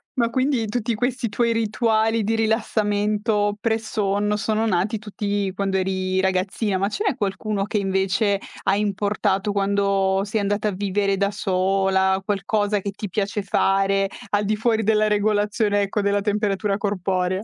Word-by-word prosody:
Ma 235 -2 +1
quindi, 255 -2 0
tutti 235 +1 -1
questi 245 +2 -1
tuoi 230 +2 +1
rituali 225 0 +1
di 225 +2 0
rilassamento 210 -1 0
pre-sonno 210 -2 0
sono 220 +1 0
nati 205 +3 0
tutti 205 -1 -2
quando 195 0 0
eri 185 0 0
ragazzina. 190 +2 0
Ma 195 +2 0
ce 310 - -3
n'è - - +1
qualcuno 205 -1 -2
che 210 - -2
invece 195 +1 +1 0.2
hai 195 +1 +2
importato 205 0 0
quando 200 -1 +1
sei 210 +1 -1
andata 205 +1 0
a - - +1
vivere 195 0 0
da 200 +1 +1
sola? 190 -1 +1
Qualcosa 205 +1 0
che 200 +1 -4
ti 205 +1 -6
piace 205 +3 -1
fare, 195 0 +2 0.2
al 205 0 +1
di 215 +2 +1
fuori 225 0 +1
della 215 0 +3
regolazione, 210 0 +1
ecco, 200 +1 -1
della 200 0 +1
temperatura 205 -1 0
corporea? 185 -1 -1
205 Hz, 150 wpm, -22 LUFS, 195-215 Hz, 0.2 s, della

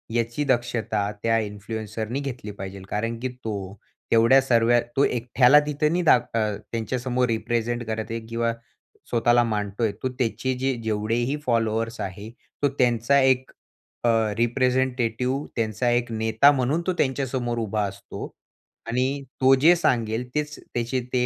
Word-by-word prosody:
याची 120 +5 0
दक्षता 110 -4 -1
त्या 115 0 +3
इन्फ्लुएन्सरनी 110 +3 -4
घेतली 125 -6 -5
पाहिजेल. 95 -1 -8
कारण 115 +2 -2
की 130 +2 -2
तो 105 -6 -6 0.4
तेवढ्या 115 +4 +6
सर्व 120 -3 +3 0.2
तो 135 - +4
एकट्याला 125 +3 +4
तिथं 150 +1 0
नाही 175 +1 +1 0.3
अ, 110 -3 0 0.2
त्यांच्यासमोर 125 +2 -1
रिप्रेझेंट 120 +1 -1
करत 110 0 -2
आहे 115 - -2
किंवा 115 0 -1 0.6
स्वतःला 120 0 +3
मांडतोय. 105 0 -1
तो 130 - +1
त्याचे 130 +2 0
जे 135 +1 +1
जेवढेही 110 +5 0
फॉलोवर्स 115 -1 0
आहे. 100 +2 -6 0.3
तो 145 - +3
त्यांचा 120 +2 +3
एक 130 -1 +2 0.5
अ, 120 - +3 0.3
रिप्रेझेंटेटिव्ह, 125 +1 0
त्यांचा 115 +1 0
एक 120 0 0
नेता 110 +5 +4
म्हणून 140 +4 0
तो 185 - +2
त्यांच्यासमोर 130 -3 -1
उभा 105 +1 0
असतो. 100 +1 -8 0.5
आणि 130 +4 0 0.2
तो 130 +1 +6
जे 170 +3 +7
सांगेल 115 -7 0
तेच 150 0 -1
त्याचे 120 +2 -3
ते 125 -1 +2
120 Hz, 140 wpm, -24 LUFS, 110-130 Hz, 0.6 s, जे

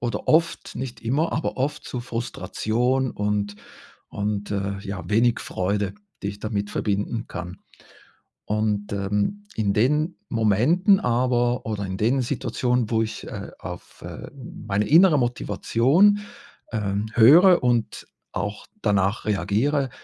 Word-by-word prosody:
oder 120 0 -3
oft, 165 +2 +2
nicht 125 -1 -6
immer, 140 +8 0
aber 145 -3 -2
oft 140 +3 -2
zu 125 - -5
Frustration 120 +1 -1
und 105 0 -2 0.5
und, 105 0 -3
äh, 100 -1 -2
ja, 100 -1 -6
wenig 115 +2 +3
Freude, 100 - -2 0.3
die 100 - -2
ich 100 0 -7
damit 105 -2 -3
verbinden 105 +3 -2
kann. 90 +2 -7 0.9
Und, 105 -1 -1
ähm, 105 - -1
in 100 -3 0
den 150 - +1
Momenten 125 - +3
aber 120 -1 +1
oder 105 -2 -3
in 95 0 -4
den 125 +6 +1
Situationen, 120 -2 -1
wo 115 -1 +2
ich, 110 - -5
äh, - - -7
auf, - - -9
äh, - - -8
meine 105 -6 -3
innere 165 +1 +6
Motivation, 135 - +2 0.5
ähm, 105 -1 -1
höre 165 - +7
und 120 -3 0 0.2
auch 100 +2 -4 0.2
danach 100 +2 +1
reagiere, 110 - +1
115 Hz, 130 wpm, -24 LUFS, 105-130 Hz, 0.9 s, höre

